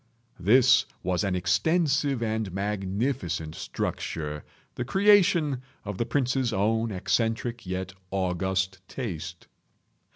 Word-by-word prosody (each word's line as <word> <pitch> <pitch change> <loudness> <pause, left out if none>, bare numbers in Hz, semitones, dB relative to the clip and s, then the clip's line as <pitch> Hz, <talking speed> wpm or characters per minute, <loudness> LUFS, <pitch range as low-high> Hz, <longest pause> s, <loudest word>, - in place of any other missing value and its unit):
This 125 +7 +5 0.2
was 90 -1 0
an 95 -2 0
extensive 140 - +1
and 110 -3 -1
magnificent 95 - -2
structure, 75 -2 -4 0.3
the - - -3
creation 180 -4 +4 0.2
of 105 -2 -5
the 115 - 0
prince's 130 -1 +1
own 110 +3 +1
eccentric 115 +3 -1
yet 95 0 -3 0.2
august 95 0 -1
taste. 90 - -6
105 Hz, 100 wpm, -27 LUFS, 95-130 Hz, 0.3 s, This